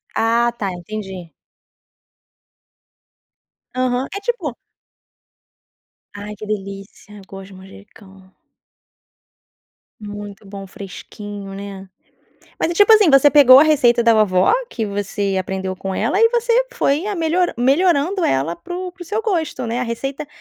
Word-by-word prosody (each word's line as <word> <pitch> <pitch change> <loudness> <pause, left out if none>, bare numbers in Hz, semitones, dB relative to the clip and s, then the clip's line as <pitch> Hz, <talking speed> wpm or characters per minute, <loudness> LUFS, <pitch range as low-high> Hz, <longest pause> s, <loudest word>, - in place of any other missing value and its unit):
Ah, 235 +1 +2
tá, 200 -4 -2
entendi. 190 -2 -8 2.4
Aham, 255 0 0
é - - -3
tipo 390 - -3 1.6
ai, 205 +1 -7
que 215 - -9
delícia! 200 0 -7
Eu 195 - -13
gosto 195 0 -10
de 195 - -15
manjericão. 190 0 -16 1.7
Muito 205 0 -9
bom, 195 0 -9
fresquinho, 200 +1 -9
né, 195 -1 -8 0.7
mas - - +1
é, 345 - -3
tipo 410 +4 +5
assim, 425 -4 +6
você 275 +1 +6
pegou 265 -3 +8
a 285 - +8
receita 245 -6 +3
da 230 -1 +5
vovó 210 - +3 0.2
que 225 - -4
você 200 -1 -2
aprendeu 190 0 -4
com 190 +1 -5
ela 230 - 0
e 455 - +6
você 480 +1 +1
foi 315 -4 0
a 415 - -2
melhoran 340 +1 0
melhorando 335 +7 +2
ela 135 +6 0
para 260 - -8
o 365 0 -5
para 370 - -32
o - - -9
seu 425 +5 -3
gosto, 320 - -2
né, 235 +2 -2
a - - 0
receita, 260 +4 -4
225 Hz, 140 wpm, -19 LUFS, 195-315 Hz, 2.4 s, pegou